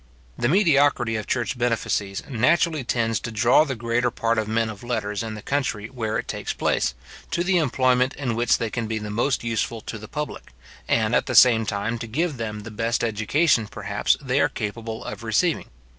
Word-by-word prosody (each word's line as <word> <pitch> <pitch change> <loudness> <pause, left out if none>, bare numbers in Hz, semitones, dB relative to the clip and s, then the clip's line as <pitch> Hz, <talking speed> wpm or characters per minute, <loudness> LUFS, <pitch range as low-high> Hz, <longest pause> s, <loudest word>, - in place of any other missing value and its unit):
The 120 - 0
mediocrity 145 - +3
of 110 - -4
church 120 0 -1
benefices 115 -5 -1
naturally 150 +4 +2
tends 115 -2 0
to 120 - -6
draw 120 +8 +4
the 135 -3 -3
greater 120 +2 0
part 115 -1 0
of 110 - -2
men 115 +1 +1
of 110 -2 -7
letters 110 -4 -2
in 110 -1 -5
the 105 - -9
country 115 -6 -2
where 115 -5 -2
it - - -4
takes - - -3
place, 65 - 0 0.3
to 175 - 0
the 180 0 +3
employment 130 -3 +2
in 135 -5 -2
which 120 +1 +3
they 115 -3 -3
can 115 -2 -2
be 110 0 -2
the 105 -1 -5
most 120 +6 0
useful 115 0 -1
to 110 - -7
the 110 - -9
public, 150 +5 -6 0.3
and - - +2
at - - +2
the - - -2
same 115 -3 +6
time 105 +3 -2
to 115 - -5
give 150 +5 -1
them 105 -2 -4
the 110 +2 -9
best 115 +3 -1
education, 115 +3 +2
perhaps, - - 0
they - - 0
are - - +3
capable 110 +1 -5
of - - -6
receiving. - - +1
115 Hz, 205 wpm, -24 LUFS, 110-130 Hz, 0.3 s, same